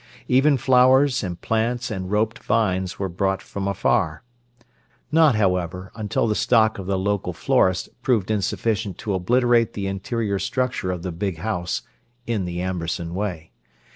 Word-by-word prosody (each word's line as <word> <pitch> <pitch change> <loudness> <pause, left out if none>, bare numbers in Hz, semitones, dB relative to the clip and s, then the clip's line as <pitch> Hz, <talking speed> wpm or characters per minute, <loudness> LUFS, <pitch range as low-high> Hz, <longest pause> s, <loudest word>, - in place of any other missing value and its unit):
Even 135 +3 +4
flowers 130 +1 +4
and 90 -2 -4
plants 120 +2 -1
and 95 -3 -4
roped 105 +2 0
vines 95 -4 0
were 100 - -2
brought 95 +2 -1
from 100 -1 -5
afar—not, 120 - -1
however, 90 -2 -1
until 105 0 -1
the 110 - +1
stock 110 -1 +3
of 95 - -6
the 95 -1 0
local 100 +1 -1
florists 95 0 +1
proved 110 -6 +1
insufficient 105 -1 -1
to 105 - -3
obliterate 120 +5 +2
the 100 - -4
interior 100 +1 -2
structure 125 -6 -1
of 90 -2 -3
the 90 - -3
big 90 +1 -3
house, 90 -2 -2 0.4
in 110 -5 -1
the 90 0 -4
Amberson 85 -2 -3
way. 90 -5 -4
100 Hz, 145 wpm, -23 LUFS, 95-120 Hz, 0.4 s, Even